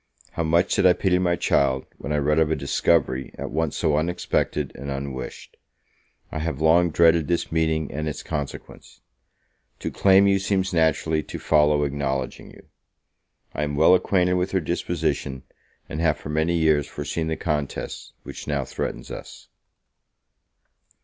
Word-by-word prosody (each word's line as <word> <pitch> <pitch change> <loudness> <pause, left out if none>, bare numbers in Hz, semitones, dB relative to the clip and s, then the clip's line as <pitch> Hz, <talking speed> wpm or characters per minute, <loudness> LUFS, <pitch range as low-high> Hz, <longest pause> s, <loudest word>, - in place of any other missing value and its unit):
How - - -3
much 85 +3 +2
did 95 - +4
I 90 - +6
pity 90 -1 +1
my 90 -1 +2
child, 65 -5 +1
when 70 - -5
I 75 - +1
read 75 +2 +2
of 80 -1 +3
a 80 - +1
discovery 70 -1 0
at - - -5
once 80 0 -1
so 75 -3 +1
unexpected 75 -3 -1
and 70 +1 -7
unwished! 70 -2 -6 0.7
I 80 - -4
have 80 -3 -3
long 85 +2 +4
dreaded 80 -1 +4
this 85 +1 -1
meeting 80 -2 0
and 75 +2 -3
its 75 - -6
consequence; 75 -3 -7 0.8
to - - -4
claim 95 0 +5
you 100 0 +3
seems 95 -1 0
naturally 80 -1 +2
to - - -8
follow 75 -1 +3
acknowledging 70 -2 -3
you. - - -16 0.9
I - - -3
am 75 -1 -2
well 80 +5 +6
acquainted 90 -1 +2
with 90 +1 -1
her 95 - +3
disposition, 75 -5 -2 0.4
and 75 - -4
have 80 -2 +2
for - - -9
many 80 +3 +1
years 80 -3 +2
foreseen 80 +2 -4
the 80 - -2
contest 75 -4 -4
which - - -9
now 70 -3 -1
threatens - - -5
us. - - -10
80 Hz, 160 wpm, -24 LUFS, 75-85 Hz, 0.9 s, I